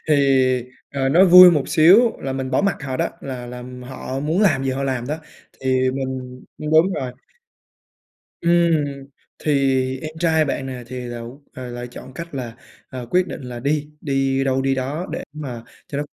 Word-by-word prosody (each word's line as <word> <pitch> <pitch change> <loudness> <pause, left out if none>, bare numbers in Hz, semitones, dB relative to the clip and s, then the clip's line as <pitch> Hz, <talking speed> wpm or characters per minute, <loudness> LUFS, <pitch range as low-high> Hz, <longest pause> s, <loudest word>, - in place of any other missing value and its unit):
thì, 150 - +5 0.8
ờ, 135 -1 0
nói 180 +7 +6
vui 180 0 +10
một 150 -5 0
xíu 205 +9 +6
là 135 - -4
mình 130 -1 -3
bỏ 130 - +2
mặc 200 -2 +1
họ 130 -1 -3
đó, - - 0
là 125 -3 -6
là 125 0 -8 0.3
họ 130 0 -5
muốn 160 +7 0
làm 145 -9 +3
gì 135 - 0
họ 135 +1 -2
làm 130 -3 -2
đó. 155 +2 -3 0.4
Thì 130 -1 +2
mình 130 -1 -5 0.2
ưm, 150 0 -4
đúng 165 +5 +4
rồi. 125 -5 -3 1.3
Ừm, 170 -3 +3 0.5
thì 135 -3 +1
em 155 - -5
trai 160 -2 +3
bạn 135 -2 -3
nè 125 -2 -6
thì 125 0 -6
lậu 120 +3 -8
ờ, 125 -1 -7
lại 120 0 -6
chọn 130 +1 -11
cách 170 -3 -8
là, 120 -3 -5 0.3
ờ, 125 -2 -7
quyết 180 0 +3
định - - -7
là 120 -1 -7
đi, 150 +2 -1
đi 135 -1 0
đâu 135 0 +1
đi 135 0 +1
đó 140 +7 -3
để - - -4
mà 130 -6 -7 0.2
cho 140 - -4
nó 145 - -1
135 Hz, 195 wpm, -21 LUFS, 130-155 Hz, 1.3 s, vui